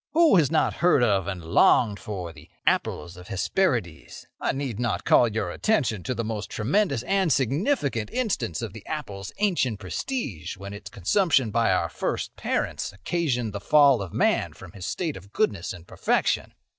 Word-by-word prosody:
Who 325 - +6
has 155 -5 +4
not 160 - +1
heard 170 -7 +5
of 100 -5 +2
and 90 -4 -5
longed 100 +5 +4
for 90 -5 -6
the 80 -1 -15 0.2
'apples 85 +4 0
of 90 - -12
the - - -6
Hesperides'? 95 - -1
I - - 0
need 135 -5 -4
not 120 -3 -1
call 120 - +5
your 105 -5 -2
attention 130 - 0
to 125 - -3
the 115 - -2
most 110 -2 -4
tremendous 135 - 0
and 195 -1 +1
significant 140 - 0
instance 205 - -2
of 110 -4 -5
the 110 -2 -10
apple's 100 -11 -5
ancient 165 - +1
prestige 170 - -4
when 100 +1 -8
its 100 0 -9
consumption 130 - +2
by 115 -2 +2
our 90 -2 +1
first - - -3
parents - - -2
occasioned 120 - -2
the 100 - -3
fall 140 +2 +5
of 95 -4 -6
man - - +1
from 95 -2 -12
his 95 -1 -7
state 165 -5 -2
of 95 +2 -12
goodness 100 -4 0
and 90 -2 -10
perfection." - - 0
110 Hz, 180 wpm, -25 LUFS, 95-150 Hz, 0.2 s, Who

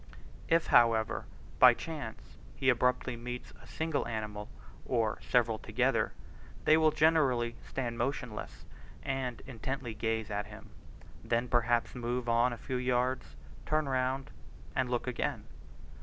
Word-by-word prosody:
If, 165 0 +4
however, 115 -2 +4 0.3
by - - +9
chance 150 -9 -7 0.2
he 135 - +2
abruptly 125 0 +2
meets 125 +1 -7
a - - -15
single 160 -2 -1
animal, 105 -2 -4 0.3
or 115 -4 0
several 115 -3 +2
together, - - +1 0.5
they 155 - +7
will 160 0 +5
generally 150 -7 +3
stand 120 -3 -3
motionless 125 -5 -3 0.4
and 130 -3 -2
intently 130 -1 -4
gaze 110 0 -2
at 105 +1 -2
him; 105 +1 -12 0.5
then 120 +1 0
perhaps 120 -1 +2
move 120 0 -2
on 120 +2 +3
a 120 - -5
few 130 +2 -3
yards, 125 0 0 0.3
turn 155 -1 +1
round, 130 0 -1 0.4
and 130 -1 +1
look 120 -1 -1
again. 125 -2 -2
125 Hz, 130 wpm, -32 LUFS, 115-130 Hz, 0.5 s, by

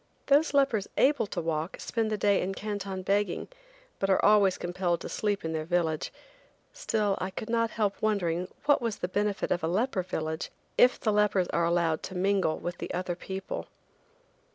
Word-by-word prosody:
Those 285 +1 +3
lepers 270 -8 +3
able 265 -5 +3
to 185 - -4
walk 160 0 -2
spend 225 -2 -1
the 215 - 0
day 200 0 +3
in 195 +1 -2
Canton 200 -3 -4
begging, 200 -1 0 0.5
but 195 - 0
are 190 - +3
always 205 -3 +5
compelled 175 -1 -1
to - - -6
sleep 205 -4 -1
in 160 - -2
their 155 -1 -2
village, 165 -2 0 0.6
still 210 -3 0
I 185 - -1
could 220 +4 -6
not 230 -1 +2
help 210 -3 -1
wondering 180 -5 0 0.2
what 290 -2 +4
was 230 -3 -1
the - - -2
benefit 205 +2 -1
of 175 - 0
a - - +1
leper 200 +3 0
village 160 -3 -3 0.3
if 250 - +5
the 215 - +1
lepers 205 -3 +2
are 170 0 +1
allowed 170 -2 +1
to 190 - -7
mingle 190 -3 +1
with 175 0 -5
the - - -5
other 180 -1 -2
people. 190 +2 -5
195 Hz, 185 wpm, -29 LUFS, 175-210 Hz, 0.6 s, always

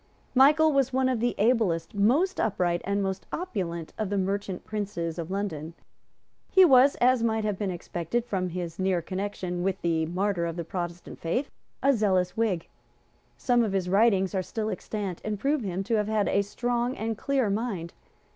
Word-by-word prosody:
Michael 300 +4 +5
was 270 -1 +2
one 260 0 +2
of 255 -3 0
the 240 +2 0
ablest, 210 -7 +1
most 255 - +2
upright 175 -5 +1
and 200 +1 0
most 190 0 -3
opulent 180 - -4
of 215 -3 -1
the 200 - -1
merchant 195 -1 -2
princes 185 -6 -3
of 165 0 -4
London. 170 -5 -4 0.7
He 380 -1 +7
was, 270 -2 +6
as 250 0 +3
might 220 -1 +1
have 210 -3 -2
been 205 -2 -1
expected 175 +5 -3
from 190 -6 -2
his 170 -1 -5
near 185 -2 +1
connection 185 -1 -3
with 190 +1 -1
the 160 -2 +1
martyr 180 0 0
of 165 - -4
the 170 - -3
Protestant 175 0 -6
faith, 245 - -2 0.3
a 275 +1 +5
zealous 190 -6 +1
Whig. 210 -7 0 0.7
Some 245 -2 +2
of 210 -3 -1
his 185 -2 0
writings 195 -1 +3
are 190 - +1
still 220 +3 -3
extant, 200 -5 -4
and 210 -1 -3
prove 285 +3 +1
him 190 -2 -3
to 225 +2 0
have 210 -1 0
had 215 -2 +1
a 200 - +2
strong 240 +4 -2
and 225 +1 -2
clear 265 -2 0
mind. 200 -6 -3
200 Hz, 185 wpm, -27 LUFS, 180-235 Hz, 0.7 s, He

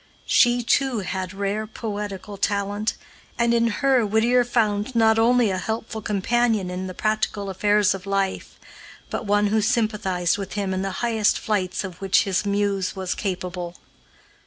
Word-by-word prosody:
She, 245 0 +4
too, 255 -1 +1
had 185 -1 -4
rare 200 +2 -2
poetical 205 -2 -5
talent, 205 +2 -1 0.4
and 235 -1 +2
in 235 0 +3
her 260 +2 +2
Whittier 225 +4 +3
found 225 -1 0
not 225 -1 +4
only 235 -2 +4
a 185 - -2
helpful 220 +3 -4
companion 210 -1 0
in 185 +1 -4
the 185 - -7
practical 215 -2 -1
affairs 205 +1 +3
of 195 0 -8
life, 195 -1 -2 0.5
but 225 - -4
one 205 +1 +3
who 220 - +3
sympathized 205 -5 0
with 195 -1 -5
him 200 -2 -2
in 185 - -1
the 195 - -2 0.2
highest 220 -3 +2
flights 195 -3 -1
of 185 -2 -8
which 195 -1 +3
his 195 +1 -1
muse 200 -2 0
was 190 -1 -2
capable. 180 -3 -4
205 Hz, 160 wpm, -23 LUFS, 195-225 Hz, 0.5 s, She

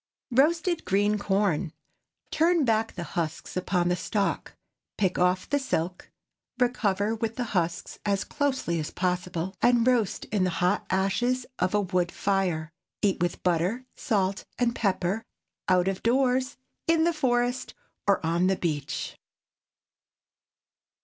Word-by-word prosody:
ROASTED 325 +6 +2
GREEN 205 +2 +2
CORN. 195 -5 0 0.6
Turn 330 -2 +3
back 225 -1 +1
the 175 - -4
husks 165 0 -4
upon 180 -1 +1
the 180 - +2
stalk, 200 +2 -2 0.4
pick 190 -3 +1
off 180 +1 +2
the 285 - +1
silk, 180 -9 -2 0.5
recover 220 -5 +1
with 225 0 -2
the 250 - -1
husks 170 -3 -1
as 200 -1 +1
closely 265 - -1
as 155 - -3
possible, 180 0 -2
and 240 -1 +4
roast 240 -6 +1
in 205 -3 +2
the 185 - +2
hot 180 +3 +1
ashes 240 +7 +1
of 180 +3 +1
a 205 - +3
wood 180 -2 0
fire. 180 -6 0 0.3
Eat 200 -2 +2
with 175 -1 -1
butter, 180 +8 +1
salt, 200 -3 0
and 240 -1 +1
pepper, 195 +1 0 0.5
out 180 0 +4
of 195 -1 -1
doors, 255 +1 +2 0.3
in 325 -1 +4
the 340 +1 +3
forest, 245 -3 0 0.3
or 195 -5 +3
on 170 +3 +2
the 190 - +3
beach. 150 -6 -3
195 Hz, 135 wpm, -27 LUFS, 180-245 Hz, 0.6 s, and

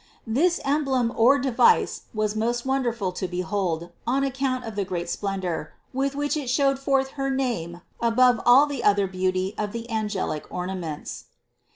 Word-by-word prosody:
365. 220 - -4
This 340 +4 +2
emblem 270 -5 +1
or 250 +5 +5
device 255 -3 +3
was 215 -1 -1
most 235 +3 -1
wonderful 240 -7 0
to 180 +1 -3
be 180 0 -3
hold, 175 -4 -2 0.2
on 270 +3 +2
account 265 -2 -1
of 225 -2 -6
the 205 - 0
great 180 -2 -4
splendor, 190 -6 -3 0.2
with 275 +1 -1
which 290 +1 0
it 285 -5 -3
showed 275 +1 +2
forth 270 -1 +1
her 275 0 -3
name 230 -11 -2 0.2
above 245 +1 +4
all 255 +4 +7
the 285 -4 -4
other 200 -1 +4
beauty 185 +1 -1
of 210 0 -2
the 235 0 -5
angelic 205 -8 -2
ornaments. 180 -4 -5
230 Hz, 170 wpm, -25 LUFS, 190-270 Hz, 0.2 s, all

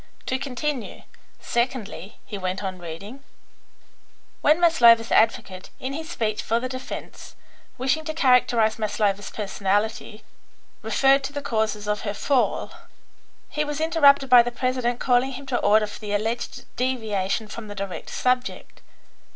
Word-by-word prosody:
To 260 - -1
continue: 275 -1 -4 0.4
'Secondly,' 235 -5 -3
he 210 - -7
went 185 0 -3
on 185 -1 -4
reading, 195 +11 -9 1.2
'when 305 +3 +4
Maslova's 235 -9 +5
advocate, 220 -5 +1
in 260 +1 -4
his 315 +2 -6
speech 215 -9 -2
for 230 +1 0
the 255 - -3
defence, 255 +1 -8 0.4
wishing 265 +5 0
to 315 - -3
characterise 245 -6 +3
Maslova's 205 -2 -1
personality, 210 +2 -2 0.6
referred 275 0 +3
to 280 - -5
the 285 -1 -4
causes 215 -4 -1
of 210 0 -1
her 205 -1 -3
fall, 265 +3 0 0.8
he 300 - -2
was 295 0 -4
interrupted 300 -4 +4
by 250 -1 +8
the 240 - -2
president 245 0 -1
calling 255 +1 +2
him 275 +2 -8
to 260 -2 -1
order 215 +1 +4
for 210 - -9
the 210 -2 -5
alleged 225 +3 -3
deviation 220 -5 -1
from 215 +1 -8
the 205 - -8
direct 195 -1 -6
subject. 250 0 -2
235 Hz, 145 wpm, -24 LUFS, 210-265 Hz, 1.2 s, by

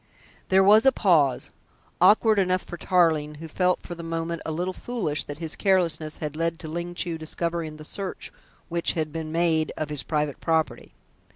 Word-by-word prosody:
There 190 0 +5
was 215 +5 +6
a - - +8
pause, 160 - +2 0.5
awkward 215 +3 +5
enough 185 -1 +1
for 175 - -8
Tarling, 160 -4 +2
who 160 +2 -8
felt 180 +3 0
for 175 - -7
the 170 - -8
moment 165 0 -3
a - - -2
little 180 +4 -2
foolish 185 -10 -2
that 145 - -7
his 160 -1 -4
carelessness 170 -5 +1
had 150 -1 -5
led 165 +1 -1
to 160 - -8
Ling 170 +2 -5
Chu 170 -2 -3
discovering 165 0 -3
the 155 0 -10
search 195 +3 -6 0.4
which 170 0 0
had 155 -2 -3
been 160 -1 -4
made 165 -1 +1
of 155 - -3
his 150 -3 +1
private 150 -1 -2
property. 160 -1 -1
165 Hz, 185 wpm, -25 LUFS, 155-180 Hz, 0.5 s, a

